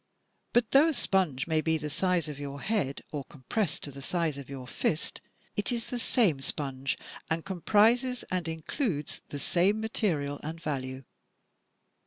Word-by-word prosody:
But 240 -2 +3
though 280 +4 +7
a 325 - +2
sponge 175 -9 +2
may 160 -1 +2
be 160 0 +2
the 150 -1 -4
size 180 +1 +2
of 145 -2 -6
your 140 0 -5
head 195 -11 0
or 145 -2 -3
compressed 160 - -2
to 145 - -2
the 140 +1 -9
size 165 0 0
of 140 - -9
your 135 -2 -6
fist, 150 +5 -1 0.3
it 205 - +1
is 235 -2 -2
the 245 - -1
same 200 - +3
sponge 135 -1 -2 0.3
and 160 0 0
comprises 225 +7 +3
and 180 -3 0
includes 160 - -2
the 145 - -4
same 185 +8 +3
material 165 -11 0
and 160 +2 -5
value. 135 -4 -3
160 Hz, 165 wpm, -30 LUFS, 140-205 Hz, 0.3 s, though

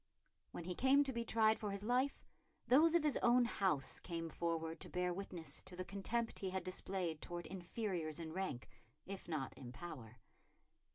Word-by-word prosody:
When - - -6
he 180 +2 -3
came 270 +8 +5
to 270 -2 -2
be 235 0 -1
tried 220 -1 +4
for 210 - -2
his 200 0 -3
life 250 +5 +1 0.4
those 315 +6 +6
of 340 - +5
his 300 -2 +3
own 240 0 +5
house 185 - +1
came 165 -2 -4
forward 165 0 -2
to - - -7
bear 180 0 0
witness 170 -6 -5
to 190 -1 -9
the 185 0 -4
contempt 225 +5 -1
he 190 - -2
had 185 -1 -2
displayed 185 -3 -2
towards 175 -1 -5
inferiors 175 -4 -3
in 160 -1 -5
rank, 185 -9 -3 0.4
if 195 +1 -6
not 150 -5 -2
in 120 -2 -8
power. 125 -6 -8
185 Hz, 180 wpm, -39 LUFS, 165-225 Hz, 0.4 s, those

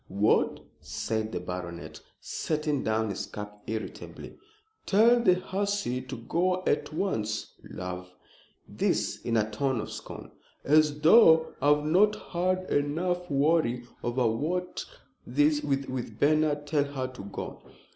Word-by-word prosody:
what!" 100 +3 +2 0.2
said 110 -1 -3
the - - -3
baronet, 90 -1 -6 0.2
setting 150 -3 -2
down 110 -1 0
his 95 - -4
cup 105 0 -8
irritably. 110 0 -6 0.5
"Tell 230 +4 +5
the 190 -6 +4
hussy 195 -8 -2
to 130 +1 -7
go 180 +10 0
at 145 - 0
once. 110 - -2 0.2
Love?" 90 0 -6 0.6
This - - -1
in 115 -1 +1
a 110 -1 +2
tone 130 +3 0
of 110 - -5
scorn. - - -9 0.3
"As 150 0 +3
though 160 -2 +6
I've 150 +1 +3
not 200 +7 +4 0.2
had 185 +1 0
enough 175 +5 0
worry 140 -4 +2 0.2
over 125 +9 0 0.6
that 145 +4 +2
with 130 -5 -3
Bernard. 150 0 +2
Tell 145 -1 +1
her 140 -2 -4
to 130 -4 -10
go." 100 - -7
145 Hz, 125 wpm, -28 LUFS, 115-165 Hz, 0.6 s, though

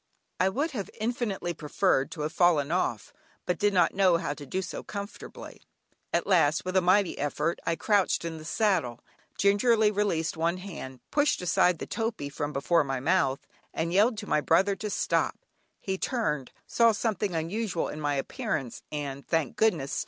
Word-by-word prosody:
I 185 - +4
would 285 +11 -1
have 210 -8 -4
infinitely 215 -6 -2
preferred 150 -2 +1
to 155 - -7
have 155 +2 -2
fallen 160 -4 +3
off, 120 - -1 0.3
but 180 - -1
did 205 0 +3
not 180 -4 +3
know 190 -3 +4
how 155 - -2
to 145 -1 -10
do 190 +7 -2
so 180 - -6
comfortably. 200 0 -8 0.5
At - - +1
last, 165 -5 +3
with 185 0 -3
a 190 - +5
mighty 185 +1 +3
effort 150 +3 -1
I 165 - +2
crouched 200 -3 +1
in 160 -1 -5
the - - -10
saddle, 170 - 0 0.4
gingerly 210 +2 +4
released 195 -7 0
one 165 +2 0
hand, 155 -9 -8
pushed 295 0 +2
aside 180 0 +3
the - - -5
topee 225 -11 -3
from 145 +1 -3
before 150 +4 +2
my 135 -2 -2
mouth, 140 -2 +1 0.3
and 165 +1 -1
yelled 215 +4 +4
to 210 -1 -6
my 150 - +2
brother 190 +6 +3
to 210 - -4
stop. - - 0 0.4
He 190 -1 -3
turned, 150 - -1
saw 230 -1 +4
something 210 -4 -1
unusual 175 +3 -2
in 155 - -6
my 145 -1 0
appearance, 140 - -3
and, 140 -2 -4
thank 165 -5 0
goodness! 165 -11 +1
180 Hz, 175 wpm, -28 LUFS, 150-205 Hz, 0.5 s, a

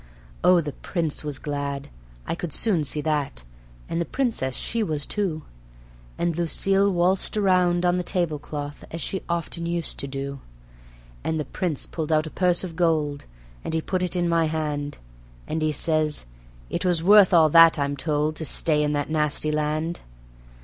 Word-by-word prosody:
Oh, 180 0 +6
the 150 -2 -4
Prince 160 0 -3
was 145 -2 -3
glad, 140 -1 -4 0.4
I - - -2
could 170 -2 -5
soon 190 -9 +2
see 150 +1 0
that, 145 - -2 0.4
and 165 - -2
the - - -1
Princess 220 - -1
she 230 - -2
was 155 -8 -1
too; 180 -7 -2 0.7
And 170 -2 0
Lucille 195 +4 +1
waltzed 185 +3 +1
round 180 -3 +3
on 175 0 +3
the 180 - -1
tablecloth 150 -5 -3
as 165 - -6
she 190 +2 -3
often 170 0 -2
used 170 -1 -2
to 140 - -2
do. 140 0 -5 0.8
And 160 0 -1
the 150 - -2
Prince 170 -7 -2
pulled 160 -1 -4
out 155 0 +3
a 155 - -7
purse 180 -1 +2
of 175 -3 -6
gold, 155 -4 0 0.4
and 160 - -2
he - - +2
put 185 +3 -2
it 180 0 -1
in 175 -1 +1
my 165 -1 +2
hand; 150 -2 -3 0.5
And 160 +1 -2
he 155 0 +1
says: 155 - +1 0.4
"It - - -3
was 175 -3 +1
worth 205 0 +7
all 165 -3 +6
that, 165 +1 +7
I'm 140 0 -1
told, 150 +2 -1
to 160 - -4
stay 150 0 +3
in 150 0 0
that 145 +1 -2
nasty 150 0 +2
land." 155 +2 -1
160 Hz, 175 wpm, -24 LUFS, 150-175 Hz, 0.8 s, worth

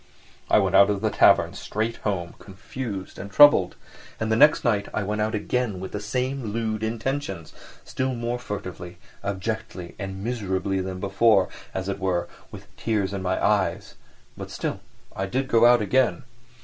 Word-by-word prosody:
I - - +5
went - - +2
out 100 - +7
of 100 -1 -1
the - - 0
tavern - - +4
straight 110 +2 -3
home, 90 -5 -3
confused 100 0 -7
and 100 - -7
troubled, 145 -9 +6 0.4
and 110 0 -1
the - - +4
next 150 +5 +5
night 105 -5 +1
I 110 - 0
went 105 +2 -2
out 110 +1 0
again 105 -1 -1
with 95 0 -6
the 105 - -4
same 125 +5 -2
lewd 110 -1 -2
intentions, 110 - -3 0.3
still 130 0 -2
more 120 +1 -3
furtively, 90 -5 -7 0.3
abjectly 100 -2 -4
and 95 -1 -6
miserably 95 -5 -1
than 95 0 -5
before, 100 0 +3 0.2
as 95 0 -4
it 100 0 -3
were, 95 -2 -1 0.2
with - - -11
tears 105 -4 -1
in 100 - -3
my 95 0 -1
eyes—but - - -3
still - - -4 0.4
I 95 - -2
did 130 +6 -1
go 115 -1 +5
out 120 -2 +5
again. 130 +6 +1
105 Hz, 165 wpm, -24 LUFS, 95-115 Hz, 0.4 s, out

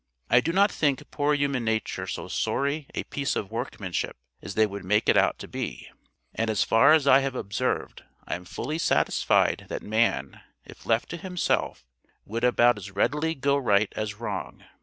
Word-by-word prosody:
I 125 - +6
do 165 - -1
not 200 +3 +4
think 145 -1 -1
poor 145 0 +1
human 140 -3 0
nature 110 -1 -2
so - - -5
sorry 140 +1 -1
a - - -2
piece 140 -1 -2
of 100 - -3
workmanship - - -4 0.2
as 100 - -7
they 110 - +4
would 100 -2 -6
make 105 +4 +1
it - - +5
out - - +3
to - - -9
be; - - -6 0.4
and 115 0 -1
as 110 - +2
far 140 +7 +5
as 155 -3 +4
I 135 -1 +7
have 135 -1 -2
observed, 120 +3 -2 0.2
I - - -4
am 90 +1 -5
fully 150 - -4
satisfied - - +2
that - - -5
man, 110 -11 0 0.2
if - - -14
left 115 0 +1
to 170 - -5
himself, 180 - -2 0.4
would 115 +3 -4
about 120 -2 +4
as 100 0 -8
readily 150 +11 0
go 140 0 +1
right 105 -6 +2
as 110 -1 -3
wrong. 105 -3 -6
125 Hz, 185 wpm, -26 LUFS, 105-145 Hz, 0.4 s, I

